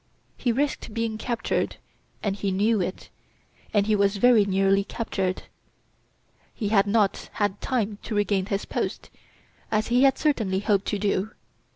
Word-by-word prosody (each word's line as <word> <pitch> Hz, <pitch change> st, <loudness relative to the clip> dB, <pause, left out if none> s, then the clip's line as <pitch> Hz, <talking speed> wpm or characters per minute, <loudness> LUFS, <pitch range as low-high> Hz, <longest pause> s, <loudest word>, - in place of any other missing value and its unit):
He 245 Hz, -, 0 dB
risked 270 Hz, -3 st, -2 dB
being 225 Hz, -1 st, -2 dB
captured, 235 Hz, 0 st, -1 dB, 0.5 s
and 200 Hz, -2 st, 0 dB
he 200 Hz, -1 st, -2 dB
knew 210 Hz, +2 st, +2 dB
it. 185 Hz, +1 st, -5 dB, 0.6 s
And 205 Hz, -2 st, +2 dB
he 215 Hz, 0 st, +2 dB
was 200 Hz, 0 st, +2 dB
very 235 Hz, -2 st, +5 dB
nearly 195 Hz, 0 st, +2 dB
captured. 195 Hz, -4 st, -3 dB, 1.1 s
He 210 Hz, -4 st, -2 dB
had 205 Hz, -2 st, +3 dB
not 205 Hz, -1 st, +1 dB
had 205 Hz, -1 st, -1 dB
time 220 Hz, -6 st, -1 dB
to 220 Hz, -, -5 dB
regain 200 Hz, -2 st, +1 dB
his 200 Hz, -2 st, -2 dB
post, -, -, -4 dB, 0.6 s
as 215 Hz, +1 st, 0 dB
he 245 Hz, +1 st, +3 dB
had 270 Hz, -1 st, +5 dB
certainly 220 Hz, -11 st, +1 dB
hoped 205 Hz, -2 st, +1 dB
to 205 Hz, -, 0 dB
do. 200 Hz, +1 st, -1 dB
205 Hz, 155 wpm, -25 LUFS, 195-230 Hz, 1.1 s, very